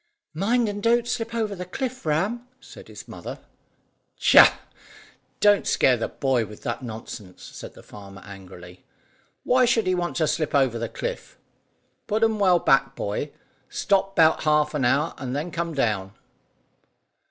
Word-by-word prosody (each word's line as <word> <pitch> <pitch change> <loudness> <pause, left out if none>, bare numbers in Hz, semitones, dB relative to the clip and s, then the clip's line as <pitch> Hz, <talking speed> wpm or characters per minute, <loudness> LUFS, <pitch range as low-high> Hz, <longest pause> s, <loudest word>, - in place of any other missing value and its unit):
"Mind 225 +8 +1
and 205 0 -4
don't 235 +2 +3
you - - -19
slip 230 -1 -3
over 220 -3 -1
the 180 -2 -6
cliff, 255 - -5
Ram," 210 +11 -1
said - - -14
his - - -11
mother. - - -8 0.8
"Tchah! - - +7 0.8
Don't 205 -1 +4
scare 130 - +3
the 115 - -3
boy 130 -4 0
with 105 -1 -11
that 120 - -3
nonsense," 110 -5 -9
said - - -10
the - - -14
farmer 100 -1 -12
angrily; 90 -2 -12 0.6
"why 255 0 +4
should 230 -2 +2
he 185 - +1
want 175 -1 -2
to 160 - +1
slip 155 -2 -1
over 130 -4 +2
the 115 - -3
cliff? - - -6 0.7
Put 220 +1 0
'em 220 -1 +2
well 185 -3 +4
back, 135 -5 +2
boy. 100 0 -3 0.4
Stop 195 -1 0
'bout 160 -3 +4
half 150 0 +2
an 145 -4 0
hour, 145 +6 +1
and 130 -1 -4
then 155 +5 -3
come 170 -1 -3
down." 105 -7 -1
160 Hz, 165 wpm, -24 LUFS, -, 0.8 s, Tchah